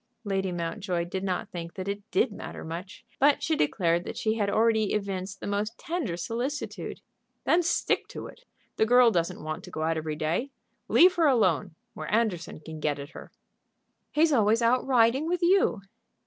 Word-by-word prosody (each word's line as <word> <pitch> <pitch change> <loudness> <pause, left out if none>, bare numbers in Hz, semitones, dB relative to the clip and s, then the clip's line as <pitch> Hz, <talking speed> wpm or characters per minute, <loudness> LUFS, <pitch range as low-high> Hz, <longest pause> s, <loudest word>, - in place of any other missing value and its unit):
Lady 195 -3 -1
Mountjoy 175 +1 -2
did 190 +2 -4
not 185 -2 -2
think 170 -1 -7
that 185 0 -5
it 200 +1 -3
did 410 - +2
matter - - -8
much; 175 +7 -7
but 285 +1 +4
she 320 - +1
declared 170 - +1
that - - -7
she 220 - +1
had 210 -3 0
already 220 0 +2
evinced 195 -2 -3
the - - -7
most 205 +3 -2
tender 320 - -3
solicitude. 240 - -4 0.4
"Then 345 - +4
stick 340 - 0
to - - -7
it. - - -12 0.3
The 220 - +3
girl 245 0 +6
doesn't 170 -5 -1
want 155 0 -5
to - - -10
go 155 - -4
out 165 0 +1
every 155 -1 -3
day. 160 - -1 0.4
Leave 360 +1 +6
her 330 -2 +4
alone, 215 - +2 0.2
where - - -6
Anderson 210 -8 0
can 160 0 -8
get 150 -1 0
at 140 0 -8
her." - - -11 0.8
"He's 310 0 +3
always 225 -1 +3
out 245 +2 +3
riding 255 +3 +3
with 355 +1 -1
you." 350 - +3
205 Hz, 185 wpm, -27 LUFS, 170-250 Hz, 0.8 s, girl